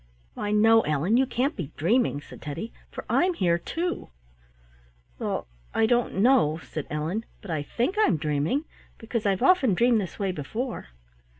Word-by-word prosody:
"Why, 205 - -3
no, 225 +2 +5
Ellen, 155 +7 +1
you 265 +1 +3
can't 265 +5 0
be 160 -6 -5
dreaming," 195 - +2
said - - -13
Teddy, 150 +10 -6 0.2
"for - - -8
I'm 360 0 +2
here 170 - +2
too." 345 - -3 1.1
"Well, - - -2 0.3
I 225 - +4
don't 240 +1 +1
know," 200 - +4
said 145 +3 -6
Ellen, 155 +9 -2 0.2
"but 200 - -8
I 155 -2 -1
think 245 - -2
I'm 230 - +4
dreaming, 155 - 0 0.3
because 225 -1 -3
I've 195 -1 +1
often 275 - +4
dreamed 235 +1 +3
this 185 - -6
way 195 -2 -1
before." 220 - -4
210 Hz, 165 wpm, -26 LUFS, 160-245 Hz, 1.1 s, no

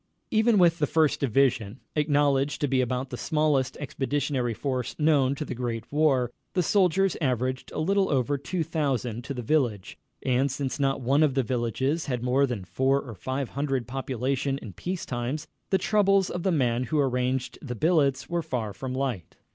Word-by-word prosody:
Even 220 0 +4
with 170 -2 +4
the 150 - +2
First 155 -1 +2
Division, 130 -3 +1 0.2
acknowledged 145 -2 +2
to 145 - +2
be 130 -1 +2
about 125 +1 -2
the 125 - -4
smallest 150 -3 +1
expeditionary 135 -3 -1
force 130 -2 -3
known 145 -3 +3
to 150 - -4
the - - -4
Great 115 -2 -4
War, 140 -5 +2 0.2
the 180 - +2
soldiers 195 +1 +3
averaged 130 -1 -1
a - - -7
little 195 +4 +2
over 135 0 +1
two 160 +5 -2
thousand 135 -7 -2
to 140 0 -4
the 125 - -4
village, 120 -8 0 0.2
and 130 +2 +2
since 135 +1 -3
not 135 -1 +1
one 135 +4 +2
of 145 -4 +3
the 135 - +2
villages 130 +6 -1
had 125 -3 -2
more 130 +3 +3
than 115 -7 -4
four 135 +7 +1
or 125 -4 -8
five 130 +6 -3
hundred 135 -4 -2
population 135 +1 -2
in 110 -8 -9
peace 180 - -4
times, 125 +4 -3 0.2
the 190 - +3
troubles 195 -1 +2
of 175 - -3
the 190 - +1
man 125 -5 +1
who 155 - -1
arranged 130 -2 0
the 125 -4 -5
billets 145 -2 +2
were 170 0 -1
far 125 -10 -3
from 130 +5 -5
light. 130 -10 -3
135 Hz, 185 wpm, -27 LUFS, 125-150 Hz, 0.2 s, Even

